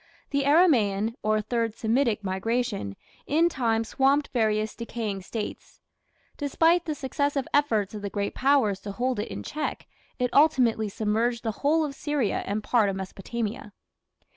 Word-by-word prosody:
The 280 -1 +1
Aramaean, 230 - +3
or 215 0 +1
Third 230 0 -1
Semitic 230 -2 +1
migration, 200 - -2 0.3
in 330 +4 +3
time 230 -7 0
swamped 275 +5 +2
various 215 -2 +1
decaying 225 -4 -4
States. 210 +3 -6 0.6
Despite 325 +4 +2
the 310 -2 -2
successive 285 0 -1
efforts 225 -9 +2
of 210 - -6
the 200 - -3
great 200 0 -2
Powers 260 -8 +2
to 200 0 -7
hold 250 +2 -1
it 210 - -2
in - - -6
check, 305 - -4 0.3
it 250 -2 -1
ultimately 250 -8 +4
submerged 225 +4 0
the 225 - 0
whole 310 +2 +3
of 285 - -5
Syria 290 -6 -1
and 210 +1 -2
part 220 -4 +3
of 195 - -2
Mesopotamia. 205 +3 -5
235 Hz, 150 wpm, -26 LUFS, 210-280 Hz, 0.6 s, ultimately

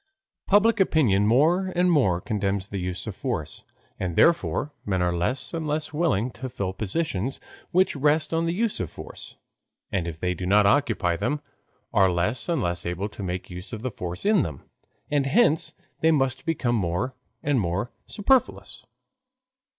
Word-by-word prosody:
Public 210 +2 +4
opinion 115 - +3
more 165 - +3
and 180 0 +3
more 100 - +3
condemns 100 -1 -1
the 100 - -4
use 90 0 -3
of - - -5
force, - - -4 0.4
and 90 -3 -2
therefore 165 - +3
men 95 -2 -1
are 90 -1 +1
less 105 - -2
and 165 -2 -3
less 150 0 -2
willing 130 - +1
to 130 +1 -6
fill 100 -6 -3
positions 110 - -2 0.3
which 185 -1 +3
rest 150 +3 +2
on 165 +1 +1
the - - +1
use 225 +1 0
of 90 - -2
force, - - -9 0.6
and 90 -3 -1
if 80 -2 -6
they 90 +1 0
do 90 +1 -3
occupy 105 -3 +3
them, 145 - -1 0.5
are 95 -3 +5
less 100 - -1
and 170 - +1
less 85 0 -1
able 90 +4 -3
to 105 - -10
make 90 -1 -4
use 90 +5 -6
of 115 +2 -4
force 90 - -5
in 210 -3 +5
them. 75 - -5 0.5
And 145 -2 +2
hence 160 - +3 0.2
they 160 - +3
must 135 -3 +1
become 135 -7 0
more 95 +6 -1 0.3
and 145 -3 +2
more 100 +5 -1 0.2
superfluous. 255 +5 +1
120 Hz, 165 wpm, -25 LUFS, -, 0.6 s, are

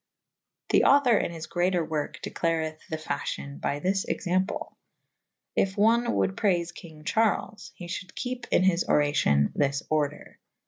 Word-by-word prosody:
[C - - +5
ii - - +7
b] - - +2
The - - +5
author 275 -4 +5
in - - -2
his 165 -1 -7
greater 175 -1 0
worke 155 -2 -4
declareth 160 -1 -1
the 160 - -2
fafhyon 145 -2 -4
by 140 - -1
this 190 +5 0
example. 185 +2 -1 0.8
If 190 0 +1
one 230 +3 +4
wolde 95 -1 +1
praife 175 -4 +1
kynge 155 -3 -12
Charles 220 +1 0
/ - - -38
he 175 - -9
fhulde 185 +2 -6
kepe 250 -1 -4
in - - +3
his 185 -2 +3
oracyon 110 - +2
this 140 -1 0
order. 150 -1 -2
170 Hz, 170 wpm, -27 LUFS, 150-190 Hz, 0.8 s, ii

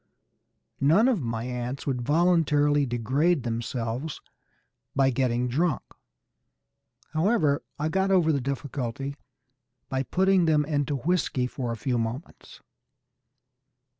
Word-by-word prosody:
None 165 - +4
of 240 -10 +2
my 115 -2 -3
ants 125 +2 -4
would 130 -3 -1
voluntarily 145 -1 +3
degrade 130 +7 +1
themselves 120 +4 -3 0.8
by 135 -1 +3
getting 125 -1 0
drunk. 150 +3 0 1.3
However, 155 -4 +2 0.2
I 150 - -1
got 190 +3 +1
over 180 -4 +4
the 140 -3 0
difficulty 135 0 -4 0.7
by 130 0 0
putting 185 +5 +2
them 150 -2 +3
into 145 -1 -1
whisky 140 -3 0
for 125 -2 -4
a 115 - -4
few 125 +1 -1
moments. 115 +8 -6
140 Hz, 110 wpm, -26 LUFS, 125-160 Hz, 1.3 s, None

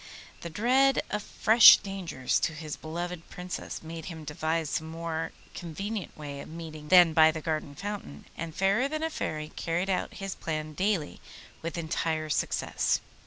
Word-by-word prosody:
The 170 - -6
dread 255 +9 +3
of 210 - -1
fresh 220 +2 +8
dangers 185 -10 -2
to 160 - 0
his 155 -1 -6
beloved 170 +2 -6
Princess 180 -1 -6
made 165 0 -7
him 165 -3 -7
devise 155 +1 -2
some 160 0 -2
more 165 0 -3 0.2
convenient 195 +5 -5
way 145 -2 -6
of - - -9
meeting 155 -2 -8
than 175 -1 +7
by 155 0 +7
the 160 0 -2
garden 155 -2 -3
fountain, 200 - -6
and 165 -1 -6
Fairer 200 +7 +2
than 310 +2 -3
a 320 - -1
Fairy 155 - -3
carried 175 +4 -1
out 185 - -2
his 195 -1 -4
plan 155 -1 -4
daily 185 -3 -1 0.4
with 165 +1 -4
entire 160 -1 -1
success. - - 0
165 Hz, 165 wpm, -29 LUFS, 155-195 Hz, 0.4 s, fresh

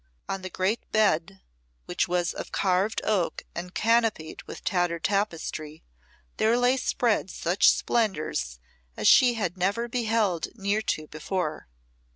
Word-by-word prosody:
On 195 0 -3
the 185 - -6
great 190 +5 -2
bed, 170 - +1 0.4
which - - -1
was 175 0 0
of - - -7
carved 190 +3 +1
oak 195 -6 0
and 180 +1 -6
canopied 225 -8 +1
with - - -9
tattered 175 -3 0
tapestry, 165 -6 -2 0.5
there 225 +2 +3
lay 245 +1 +3
spread 235 -6 0
such 175 +2 +3
splendours 185 - 0 0.4
as 105 - +1
she 250 -2 +6
had 190 -5 -2
never 205 +6 0
beheld 225 -7 0
near 205 0 0
to 155 -7 -2
before. 155 +1 -4
195 Hz, 135 wpm, -26 LUFS, 170-220 Hz, 0.5 s, she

